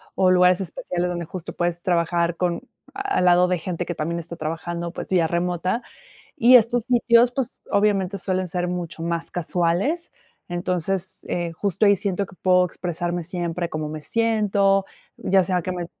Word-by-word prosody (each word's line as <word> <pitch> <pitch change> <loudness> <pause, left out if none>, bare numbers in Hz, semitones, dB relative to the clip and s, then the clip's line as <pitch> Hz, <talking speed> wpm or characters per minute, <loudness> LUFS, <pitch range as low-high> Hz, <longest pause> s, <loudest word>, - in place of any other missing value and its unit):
o 185 -1 +4
lugares 180 0 +5
especiales 180 0 -3
donde 175 -1 -3
justo 175 +1 -7
puedes 175 0 -2
trabajar 170 -1 +1
con, 175 -2 -1 0.3
al 400 - 0
lado 180 0 +5
de 180 -1 0
gente 175 +1 -3
que 175 - -3
también 170 +2 -3
está 170 +1 -7
trabajando, 170 +2 -4
pues, - - -7
vía 175 -3 +3
remota. 180 +6 -1 0.5
Y 245 +2 +8
estos 235 0 +3
sitios, 240 0 +4
pues, 265 -2 -4
obviamente, 200 -2 +1
suelen 185 0 -1
ser 180 0 -2
mucho 175 -2 -4
más 170 0 -2
casuales. 180 - -1 0.4
Entonces, 180 +1 -2
eh, 170 -1 -2
justo 200 +4 0
ahí 200 - +6
siento 200 0 -2
que 195 - -16
puedo 180 0 +3
expresarme 175 0 -3
siempre 175 0 -3
cómo 155 -1 -3
me 155 0 -6
siento, 205 -2 +2 0.3
ya 190 -1 +2
sea 180 0 0
que 185 - -4
me 175 -1 -3
180 Hz, 170 wpm, -23 LUFS, 170-195 Hz, 0.5 s, Y